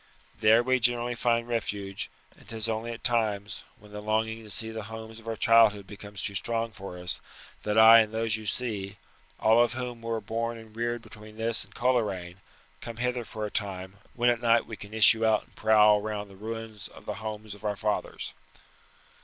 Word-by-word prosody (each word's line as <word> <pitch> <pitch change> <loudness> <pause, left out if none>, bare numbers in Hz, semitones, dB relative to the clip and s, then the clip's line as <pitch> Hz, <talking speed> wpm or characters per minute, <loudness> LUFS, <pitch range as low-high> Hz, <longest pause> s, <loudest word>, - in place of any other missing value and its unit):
There 110 +2 +6
we 130 +1 +2
generally 120 0 +1
find 120 0 +1
refuge; 100 -4 -3 0.3
and - - -18
'tis 110 -1 -2
only 115 +1 -2
at 115 - -8
times, 105 -4 0
when 105 0 -17
the 105 0 -6
longing 110 +1 0
to 105 - -12
see 110 +3 -1
the 110 -2 -6
homes 110 0 -8
of 115 - -16
our 115 - -2
childhood 110 -3 +5
becomes 100 0 -9
too 100 - -1
strong 115 +3 -1
for 95 -2 -8
us, 90 0 -1 0.4
that 105 +1 -1
I 110 +1 +10
and 110 -1 +2
those 110 -1 0
you 110 -1 -6
see 105 -5 -3 0.4
all 110 +2 +5
of 120 - -1
whom 125 -2 -5
were 115 -1 -2
born 115 +2 -3
and 110 -1 -13
reared 120 +1 -2
between 110 0 -13
this 115 0 0
and 100 +2 -19
Coleraine 100 -8 0 0.4
come 115 -1 -7
hither 125 0 -1
for 110 -1 -5
a 105 - -5
time, 95 -2 -4 0.2
when 120 0 +4
at 120 -1 -2
night 115 -1 +4
we 110 - -7
can 100 0 -11
issue 110 +1 +5
out 110 -1 +3
and - - -27
prowl 105 -1 +5
round 105 -1 -4
the - - -13
ruins 110 +1 -7
of - - -15
the - - -3
homes 110 -1 -6
of 105 - -14
our 105 -1 -1
fathers." 105 +1 -3
110 Hz, 205 wpm, -28 LUFS, 105-115 Hz, 0.4 s, I